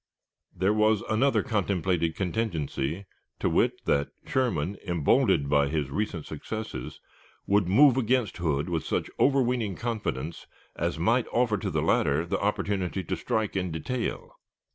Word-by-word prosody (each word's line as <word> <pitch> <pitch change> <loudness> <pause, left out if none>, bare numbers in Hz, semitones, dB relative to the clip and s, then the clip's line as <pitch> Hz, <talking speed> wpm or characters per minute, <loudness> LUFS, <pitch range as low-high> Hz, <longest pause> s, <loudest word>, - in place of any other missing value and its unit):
There 95 +4 +1
was 110 -1 +3
another 135 +6 +3
contemplated 95 -7 0
contingency, 90 -4 -2 0.3
viz., - - +2
that 70 0 +1 0.2
Sherman, 100 - 0
emboldened 85 - +2
by 70 0 +3
his 75 -2 -2
recent 95 -4 -2
successes, 110 +8 -6 0.5
would 100 -2 +2
move 130 +7 +6
against 125 -2 +1
Hood 75 -3 0
with 85 -3 -1
such - - -2
overweening 125 -7 +2
confidence 85 - -4 0.3
as 85 -1 -2
might 115 +9 +2
offer 115 -4 +1
to - - -2
the - - -1
latter 75 +4 +2
the 85 - -1
opportunity 100 -2 -1
to - - -2
strike 110 -3 -2
in 90 -1 -1
detail. 125 - -4
100 Hz, 135 wpm, -27 LUFS, 80-115 Hz, 0.5 s, move